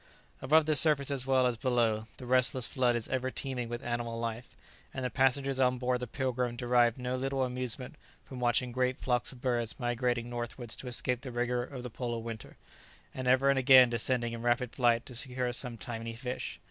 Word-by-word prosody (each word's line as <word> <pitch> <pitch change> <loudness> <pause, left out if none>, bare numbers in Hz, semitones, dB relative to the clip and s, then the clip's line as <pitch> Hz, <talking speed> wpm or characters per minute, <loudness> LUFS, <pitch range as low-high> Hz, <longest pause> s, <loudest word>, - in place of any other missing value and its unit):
] - - -33
Above 155 +4 +4
the 155 0 +2
surface 145 -2 +5
as 135 -2 -1
well 130 -1 +3
as 125 -2 0
below, 115 -3 0
the 125 - -9
restless 125 0 +4
flood 125 -1 +1
is 115 -2 -1
ever 130 0 -1
teaming 125 -3 -4
with 120 0 -5
animal 120 -1 -3
life; 115 +1 -5 0.4
and 130 - -3
the 125 - -2
passengers 135 +1 +1
on 125 -1 +3
board 125 0 0
the 125 - -5
"Pilgrim" 125 -1 -2
derived 120 -1 +2
no 125 0 -3
little 135 +1 -1
amusement 125 0 -4 0.3
from 130 - -9
watching 125 0 +1
great 125 +1 0
flocks 125 -1 -1
of 125 -2 -14
birds 120 -2 -1
migrating 120 -1 -1
northwards 120 0 -5
to 130 - -9
escape 125 0 0
the 130 -3 -7
rigour 120 0 -1
of 125 0 -7
the 125 - -7
polar 120 -1 -4
winter, 115 -1 -8 0.6
and 130 -1 -5
ever 130 +2 +4
and 135 - +1
again 130 -2 +7
descending 120 0 0
in 115 - -6
rapid 120 0 0
flight 120 -2 +2
to 125 - -9
secure 125 0 -2
some 120 -1 -3
tiny 115 -1 -6
fish. 120 -8 -5
125 Hz, 205 wpm, -30 LUFS, 120-130 Hz, 0.6 s, again